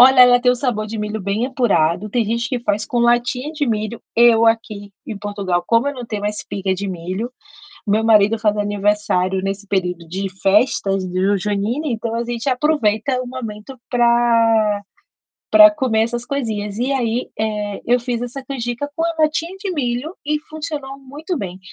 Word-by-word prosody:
Olha, 255 Hz, +1 st, +8 dB
ela 245 Hz, 0 st, +7 dB
tem 250 Hz, 0 st, +4 dB
o -, -, 0 dB
sabor 240 Hz, -4 st, -2 dB
de 220 Hz, +1 st, -6 dB
milho 210 Hz, 0 st, -3 dB
bem 200 Hz, +4 st, -1 dB
apurado. 205 Hz, -, +1 dB
Tem 235 Hz, +2 st, 0 dB
gente 235 Hz, +2 st, -1 dB
que 250 Hz, -3 st, -2 dB
faz 210 Hz, -2 st, -1 dB
com 240 Hz, -, -1 dB
latinha 240 Hz, +3 st, +1 dB
de 295 Hz, -2 st, -1 dB
milho, 220 Hz, 0 st, -2 dB
eu 230 Hz, -1 st, +5 dB
aqui, 215 Hz, -3 st, -1 dB
em 215 Hz, -3 st, -6 dB
Portugal, 200 Hz, -4 st, -2 dB
como 230 Hz, +4 st, +3 dB
eu 285 Hz, -, -3 dB
não 250 Hz, -2 st, -7 dB
tenho 210 Hz, -2 st, -4 dB
uma 205 Hz, -, +1 dB
espiga 200 Hz, -2 st, -3 dB
de 195 Hz, +2 st, -3 dB
milho, 185 Hz, +7 st, -4 dB, 0.5 s
meu 215 Hz, +2 st, +2 dB
marido 220 Hz, 0 st, +4 dB
faz 210 Hz, -1 st, +1 dB
aniversário 205 Hz, -2 st, 0 dB
nesse 195 Hz, +1 st, -4 dB
período 180 Hz, -4 st, -2 dB
de 190 Hz, +4 st, -3 dB
festas 195 Hz, -2 st, +2 dB
do 190 Hz, +3 st, +1 dB
junina, 210 Hz, -, -2 dB
então 230 Hz, -2 st, -2 dB
a 235 Hz, +1 st, -1 dB
gente 235 Hz, +1 st, -5 dB
aproveita 255 Hz, -3 st, +1 dB
o -, -, -8 dB
momento 245 Hz, 0 st, -7 dB
pra 230 Hz, -3 st, +3 dB, 0.7 s
pra 320 Hz, 0 st, +9 dB
comer 260 Hz, -8 st, 0 dB
essas 240 Hz, +1 st, -2 dB
coisinhas 220 Hz, -6 st, -3 dB
e 255 Hz, +3 st, 0 dB
aí, 245 Hz, -2 st, -1 dB
eh, 210 Hz, -2 st, -2 dB
eu 245 Hz, +1 st, +3 dB
fiz 240 Hz, -1 st, -3 dB
essa 260 Hz, +2 st, -6 dB
canjica 250 Hz, +1 st, -4 dB
com 325 Hz, -, -1 dB
a 335 Hz, -1 st, -1 dB
latinha 330 Hz, +4 st, 0 dB
de 390 Hz, -2 st, -3 dB
milho, 265 Hz, 0 st, -2 dB
e 300 Hz, 0 st, 0 dB
funcionou 300 Hz, -4 st, -6 dB
muito 290 Hz, +5 st, -6 dB
bem. 185 Hz, -3 st, -6 dB
230 Hz, 180 wpm, -19 LUFS, 205-255 Hz, 0.7 s, pra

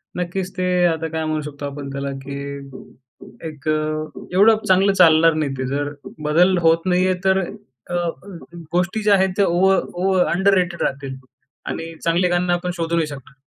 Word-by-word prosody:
नक्कीच 180 Hz, +1 st, -3 dB
ते 185 Hz, -, 0 dB, 0.2 s
आता 165 Hz, -1 st, 0 dB
काय 160 Hz, 0 st, -3 dB
म्हणू 155 Hz, 0 st, -1 dB
शकतो 145 Hz, -1 st, -7 dB
आपण 140 Hz, 0 st, -6 dB
त्याला, 140 Hz, 0 st, -4 dB
की 140 Hz, 0 st, -6 dB, 0.8 s
एक 150 Hz, -2 st, -10 dB
अ, 155 Hz, 0 st, -1 dB, 0.3 s
एवढं 215 Hz, +4 st, +6 dB
चांगलं 190 Hz, +1 st, +4 dB
चालणार 165 Hz, -3 st, +5 dB
नाही 155 Hz, -3 st, -1 dB
ते, 130 Hz, -, -3 dB
जर 145 Hz, +2 st, -2 dB, 0.4 s
बदल 180 Hz, +4 st, +4 dB
होत 165 Hz, +1 st, +3 dB
नाही 180 Hz, 0 st, +2 dB
आहे 185 Hz, -, +2 dB
तर 190 Hz, 0 st, +4 dB
अ, 175 Hz, -, -8 dB, 0.8 s
गोष्टी 180 Hz, +4 st, 0 dB
ज्या 210 Hz, -1 st, +4 dB
आहेत 190 Hz, 0 st, +2 dB
त्या 200 Hz, -, +4 dB
ओव 180 Hz, +3 st, +3 dB, 0.2 s
ओव 190 Hz, +2 st, 0 dB, 0.2 s
अंडररेटेड 185 Hz, -2 st, +2 dB
राहतील 135 Hz, -1 st, -3 dB, 0.5 s
आणि 165 Hz, 0 st, -5 dB
चांगले 170 Hz, +2 st, +2 dB
गाणे 175 Hz, 0 st, +1 dB
आपण 180 Hz, +1 st, -2 dB
शोधू 170 Hz, 0 st, -1 dB
नाही 160 Hz, -2 st, +1 dB
शकणार. 135 Hz, -2 st, -11 dB
165 Hz, 170 wpm, -21 LUFS, 145-185 Hz, 0.8 s, एवढं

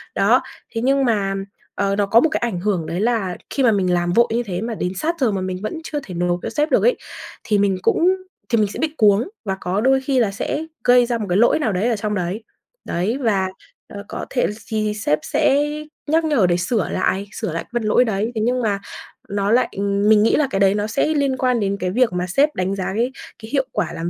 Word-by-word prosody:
Đó, -, -, +4 dB, 0.3 s
thế 225 Hz, -, -1 dB
nhưng 275 Hz, +1 st, +2 dB
mà, 205 Hz, -5 st, +1 dB, 0.4 s
ờ, 200 Hz, 0 st, 0 dB
nó 205 Hz, 0 st, +1 dB
có 220 Hz, +4 st, +5 dB
một 315 Hz, -, +3 dB
cái -, -, -1 dB
ảnh 230 Hz, -7 st, -2 dB
hưởng 185 Hz, -3 st, -1 dB
đấy 170 Hz, +3 st, -3 dB
là 215 Hz, -6 st, 0 dB
khi 275 Hz, -, -1 dB
mà 235 Hz, -, +5 dB
mình 185 Hz, -4 st, +1 dB
làm 175 Hz, 0 st, +1 dB
vội 235 Hz, +4 st, +4 dB
như 240 Hz, -, +1 dB
thế, 185 Hz, -4 st, -4 dB
mà 230 Hz, 0 st, -3 dB
đến 180 Hz, -, -2 dB
sát 325 Hz, -, -1 dB
giờ 250 Hz, -6 st, +2 dB
mà 195 Hz, -, -2 dB
mình 185 Hz, 0 st, -3 dB
vẫn 215 Hz, +10 st, -4 dB
chưa 300 Hz, -2 st, -3 dB
thể 190 Hz, -, -9 dB
nộp 175 Hz, 0 st, 0 dB
cho -, -, -2 dB
sếp 300 Hz, +2 st, -1 dB
được -, -, +3 dB
ấy, -, -, +3 dB, 0.5 s
thì 210 Hz, -, +1 dB
mình 200 Hz, -2 st, +2 dB
cũng 335 Hz, -, +2 dB, 0.4 s
thì 230 Hz, -, +2 dB
mình 210 Hz, -2 st, +3 dB
sẽ -, -, -6 dB
bị 315 Hz, -1 st, -1 dB
cuống 210 Hz, -, +4 dB, 0.2 s
và 195 Hz, -2 st, -1 dB
có 190 Hz, +4 st, -1 dB
đôi 265 Hz, +1 st, +3 dB
khi 265 Hz, -1 st, +1 dB
là 215 Hz, -5 st, +2 dB
sẽ 295 Hz, +9 st, -3 dB, 0.2 s
gây 245 Hz, 0 st, +5 dB
ra 240 Hz, 0 st, -1 dB
một 220 Hz, -, -3 dB
cái 180 Hz, -, +2 dB
lỗi 235 Hz, +7 st, +4 dB
nào 265 Hz, -8 st, 0 dB
đấy 200 Hz, +6 st, +1 dB
ở 235 Hz, -, +1 dB
trong 210 Hz, 0 st, -2 dB
đấy. 185 Hz, +4 st, -3 dB, 0.4 s
Đấy, 195 Hz, +9 st, -1 dB
và, 195 Hz, -6 st, +1 dB, 0.4 s
ờ, 200 Hz, 0 st, -8 dB
có -, -, -5 dB
thể 250 Hz, -, +1 dB
thì -, -, -4 dB, 0.3 s
thì 210 Hz, -, -1 dB
sếp 200 Hz, -7 st, 0 dB
sẽ 285 Hz, +2 st, +2 dB, 0.4 s
nhắc 320 Hz, +2 st, +2 dB
nhở 280 Hz, -12 st, +3 dB
để 175 Hz, 0 st, +2 dB
sửa 185 Hz, +4 st, -1 dB
lại 190 Hz, +2 st, -1 dB
sửa 180 Hz, -, -4 dB
lại 165 Hz, -, -3 dB
cái -, -, -28 dB
phần 240 Hz, -1 st, -1 dB
lỗi 215 Hz, +4 st, +3 dB
đấy. 220 Hz, +1 st, -1 dB
Thế 220 Hz, -, -1 dB
nhưng 250 Hz, +3 st, +1 dB
mà 205 Hz, -4 st, 0 dB, 0.5 s
nó 200 Hz, 0 st, 0 dB
lại 245 Hz, +2 st, +3 dB
mình 200 Hz, +1 st, +3 dB
nghĩ 225 Hz, -, +3 dB
là 300 Hz, -, +2 dB
cái 195 Hz, -, -1 dB
đấy 195 Hz, 0 st, +4 dB
nó 205 Hz, +1 st, -1 dB
sẽ 225 Hz, +7 st, 0 dB
liên 280 Hz, -4 st, +1 dB
quan 250 Hz, -2 st, +1 dB
đến 200 Hz, -1 st, -1 dB
cái 180 Hz, 0 st, -1 dB
việc 235 Hz, 0 st, +2 dB
mà 180 Hz, 0 st, -1 dB
sếp 285 Hz, +11 st, +2 dB
đánh 185 Hz, +2 st, -1 dB
giá 190 Hz, 0 st, -3 dB
cái 240 Hz, +4 st, 0 dB, 0.3 s
cái 220 Hz, -, -8 dB
hiệu 275 Hz, -2 st, +1 dB
quả -, -, -2 dB
làm 165 Hz, +1 st, -3 dB
215 Hz, 260 wpm, -20 LUFS, 195-250 Hz, 0.5 s, có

